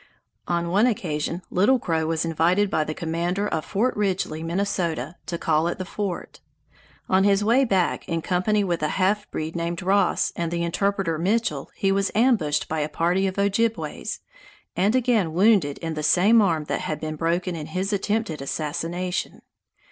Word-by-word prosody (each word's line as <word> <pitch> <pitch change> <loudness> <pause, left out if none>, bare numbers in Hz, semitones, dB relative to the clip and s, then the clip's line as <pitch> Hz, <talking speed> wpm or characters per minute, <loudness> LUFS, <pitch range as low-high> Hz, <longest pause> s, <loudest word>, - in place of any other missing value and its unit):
On 170 -1 0
one 205 +6 +4
occasion 170 -5 -2
Little 205 +9 +4
Crow 160 -8 -1
was 165 0 0
invited 175 +5 +2
by 155 - +2
the 155 0 -5
commander 175 +4 -1
of 160 -5 -2
Fort 240 +6 0
Ridgeley, 190 -6 -1
Minnesota, 175 -1 -2
to 170 - -3
call 160 0 +1
at 175 - -2
the 185 - -4
fort. 195 -2 -5 0.7
On 190 +1 +3
his 200 0 +3
way 240 +6 +4
back, 190 -6 0
in 165 -1 -1
company 200 +3 +1
with 175 -4 -1
a 155 - +1
half 205 +2 +1
breed 155 +2 -4
named 170 +1 -3
Ross 195 +2 +2
and 170 -1 -2
the 170 0 -1
interpreter 180 -1 0
Mitchell, 185 -6 0
he 195 - +1
was 195 0 +1
ambushed 215 - +2
by 160 - -2
a 150 0 -1
party 175 +5 +1
of 190 - -4
Ojibways, 205 +3 -1 0.5
and 200 +6 +2
again 230 -10 +2
wounded 185 -6 +3
in 165 -1 -4
the 155 - -4
same 190 +9 +5
arm 165 -6 +1
that - - -3
had 155 - -3
been 155 0 -4
broken 170 +3 -1
in 155 -2 -6
his 185 +5 -2
attempted 205 -5 -1
assassination. 165 +5 -3
180 Hz, 175 wpm, -24 LUFS, 165-200 Hz, 0.7 s, same